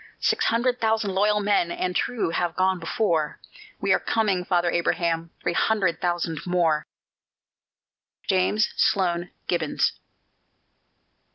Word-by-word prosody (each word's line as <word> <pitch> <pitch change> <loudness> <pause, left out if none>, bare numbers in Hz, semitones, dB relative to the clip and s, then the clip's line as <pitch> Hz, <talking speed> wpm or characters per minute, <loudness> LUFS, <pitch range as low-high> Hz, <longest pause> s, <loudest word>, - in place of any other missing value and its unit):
Six 445 0 +1
hundred 245 +2 +1
thousand 220 -3 +1
loyal 210 +2 +2
men 200 -4 +2
and 180 +1 -2
true 230 -9 -1
have 170 0 -1
gone 185 0 +1
before: 165 -4 -1 0.4
We 195 -1 +2
are - - +2
coming, 200 -5 0
Father 175 -1 +1
Abraham, 170 -1 0
three 175 - 0
hundred 195 -4 +1
thousand 175 -3 -1
more! 165 -4 +1 1.4
JAMES 195 +3 +2
SLOAN 175 -2 +1 0.2
GIBBONS. 165 -4 0
180 Hz, 115 wpm, -24 LUFS, 170-210 Hz, 1.4 s, loyal